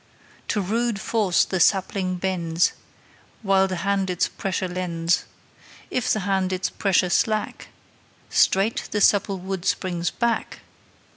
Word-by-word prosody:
To 210 - 0
rude 225 +2 -1
force 205 -4 +2
the 185 - -2
sapling 185 0 +2
bends, 175 -2 0 0.7
While 195 -1 +3
the 185 - -3
hand 195 -1 +1
its 180 -1 +1
pressure 190 -1 -3
lends; 175 -2 -1 0.7
If 250 - 0
the 215 - +1
hand 190 -1 0
its 185 0 -2
pressure 185 -2 +1
slack, 215 +3 0 0.6
Straight 195 +4 +2
the 210 - -1
supple 200 -1 +3
wood 190 0 -5
springs 175 -3 -1
back. 235 -1 -2
190 Hz, 130 wpm, -23 LUFS, 180-200 Hz, 0.7 s, While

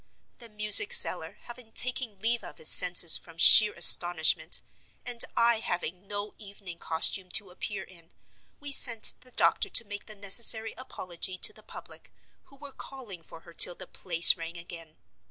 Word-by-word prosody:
The 235 -2 -15
music 210 - -1
seller - - +1
having 240 -2 -16
taken 255 -5 -2
leave 230 +3 -5
of - - -15
his 155 - -6
senses 175 -2 +5
from 165 -1 -20
sheer 210 +5 +7
astonishment, 170 -1 +2 0.4
and 245 -2 -3
I 235 -1 -2
having 180 -1 -9
no 205 +1 -9
evening 200 -4 -13
costume 175 +3 -2
to 200 -3 -1
appear 190 +2 -10
in, 170 -3 -22 0.5
we 285 0 -11
sent 235 -5 0
the 255 - -18
doctor 405 - -3
to 230 - +1
make 205 0 -13
the 215 - -13
necessary 220 +2 0
apology 185 -7 -6
to 430 - -1
the - - -20
public, - - -17 0.3
who 275 - -25
were 280 0 -16
calling 245 -10 -14
for 165 0 -17
her 170 - -20
till 175 - +3
the 185 - -14
place 170 -1 +4
rang 165 0 -12
again. 165 -2 -15
200 Hz, 170 wpm, -24 LUFS, 175-235 Hz, 0.5 s, sheer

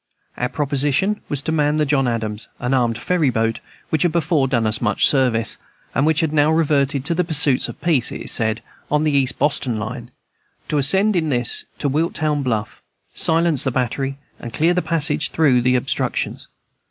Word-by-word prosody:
Our 125 - -2
proposition 145 +7 0
was 145 -1 -3
to 160 - -2
man 150 -1 +1
the 155 0 +1
John 135 -2 +1
Adams, 110 -2 -3
an 125 +2 -2
armed 120 -3 +1
ferry 160 +3 0
boat, 115 -1 -1 0.3
which 160 - +1
had 175 - +2
before 155 -4 +1
done 120 -4 0
us 110 +1 +1
much 105 -4 +3
service, 125 -5 +1 0.3
and 135 +5 +1
which 160 -2 +2
has 160 -2 0
now 150 -1 +3
reverted 145 -4 +1
to 170 - +1
the 180 +2 +1
pursuits 150 -5 +3
of - - -9
peace, 150 -9 +1
it - - -6
is - - 0
said, 110 0 +1 0.3
on 150 +1 +1
the 155 - +1
East 135 -2 +1
Boston 140 -6 0
line, 120 +3 -6 0.6
to 150 - +1
ascend 190 +9 +3
in 160 -3 0
this 120 -3 -1
to - - -2
Wiltown 150 0 0
Bluff, 115 -4 -3 0.3
silence 165 -3 +1
the - - 0
battery, 135 +2 -2 0.2
and 120 - -8
clear 165 +3 +2
a 180 - +1
passage 150 -3 +1
through 135 -6 +3
the 125 +1 +2
obstructions. 125 - -2
140 Hz, 190 wpm, -20 LUFS, 125-155 Hz, 0.6 s, much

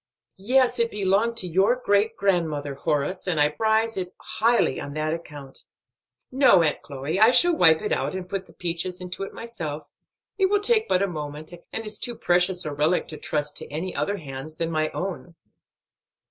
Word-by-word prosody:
"Yes, 250 +5 +2
it 230 0 +2
belonged 210 +3 +1
to 185 - 0
your 190 +7 +3
great 220 -2 +1
grandmother, 160 -7 0
Horace, 150 +6 -2
and 170 -4 0
I 150 0 +5
prize 220 +7 0
it 180 -1 -4
highly 230 -1 +1
on 145 - -6
that 155 +1 -1
account. 145 -5 -8 0.7
No, 255 -10 +5
Aunt 150 -2 0
Chloe, 145 +5 -4
I 220 +2 +7
shall 345 +7 +4
wipe 160 - +5
it - - -2
out 135 +6 -1
and 185 -1 -5
put 195 0 -4
the - - -18
peaches 175 +1 -3
into 180 +1 -7
it 195 - -4
myself; 165 -11 -6 0.5
it 385 - +4
will 410 +1 +2
take 440 +1 +2
but 185 - +3
a - - +1
moment, 150 -2 -7 0.2
and 225 - -5
it's 215 - -2
too 240 - -2
precious 180 -1 +1
a 150 - -3
relic 150 +5 +1
to 155 - -7
trust 150 0 -2
to - - -6
any 165 +5 -4
other 205 0 -1
hands 140 -1 -8
than 165 0 -2
my 155 -1 0
own." 180 -2 -5
180 Hz, 190 wpm, -24 LUFS, 155-215 Hz, 0.7 s, I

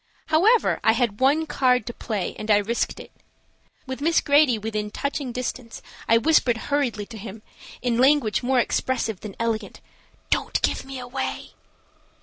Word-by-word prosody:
However, 405 +10 +3
I - - +5
had 235 -5 -1
one 285 +5 +3
card 250 -6 +2
to 240 - -5
play 210 -6 -4
and 215 - -6
I 210 - +6
risked 220 +3 -1
it. - - -11 0.7
With 260 0 -6
Miss 330 +3 +3
Grady 285 -5 +4
within 210 -1 -3
touching 280 +2 -3
distance 250 -1 -5 0.3
I 230 - +6
whispered 250 -3 +3
hurriedly 245 -5 -1
to 220 0 -10
him, 210 +1 -9 0.4
in 240 -1 0
language 265 -4 +3
more 260 +1 +1
expressive 235 -4 0
than 210 -3 -9
elegant: 230 -1 -2 0.5
"Don't - - +1
give - - 0
me 270 0 -7
away." 250 +1 -5
245 Hz, 155 wpm, -24 LUFS, 220-275 Hz, 0.7 s, I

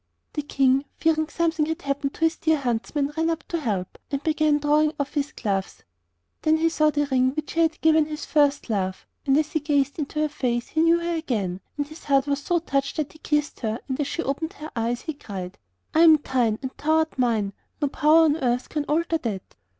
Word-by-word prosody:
The 295 - -1
King, 275 -1 +2
fearing 315 -1 +1
something 325 -2 0
had 320 +2 -3
happened 280 0 -2
to - - -15
his 325 0 +3
dear 315 -1 +2
huntsman, 275 +3 -1
ran 325 +1 +1
up 330 -1 -2
to 340 - -1
help, 200 - -3
and 280 0 -3
began 310 -1 +2
drawing 300 +1 +2
off 285 0 -2
his 290 -1 -1
gloves. 195 -8 -3 0.6
Then 315 0 +3
he 330 +1 +2
saw 305 -2 +3
the 290 -1 0
ring 260 +1 +2
which 310 -1 -4
he 330 - -1
had 325 -1 +2
given 315 -1 +4
to - - -11
his 305 0 -5
first 290 -1 +2
love, 190 -3 -2 0.2
and 270 +1 +4
as 305 0 0
he 315 - +1
gazed 285 -1 0
into 300 +1 -3
her 305 - +2
face 245 -4 -2
he 315 - +1
knew 335 +1 +5
her 340 0 -2
again, 205 - -2 0.2
and 290 - 0
his 310 +3 -13
heart 275 -1 +3
was 285 0 -1
so 350 +4 +1
touched 280 -4 -1
that 300 -2 -2
he 315 - -17
kissed 295 -1 -1
her, 220 -2 -2
and 260 +1 -3
as 290 - 0
she 335 - -2
opened 315 +6 -3
her 310 -5 -9
eyes, 235 +1 -1
he 315 - -4
cried: 195 -8 -7 0.3
'I 315 - +3
am 325 -1 +8
thine 245 -6 0
and 260 - -3
thou 310 +2 +1
art 315 -4 -1
mine, 220 -5 +1 0.3
and - - -4
no - - +4
power 310 +3 +4
on 310 -1 +3
earth 250 -4 -1
can 300 -2 -2
alter 325 +2 0
that. 210 -9 -5
295 Hz, 235 wpm, -24 LUFS, 260-315 Hz, 0.6 s, am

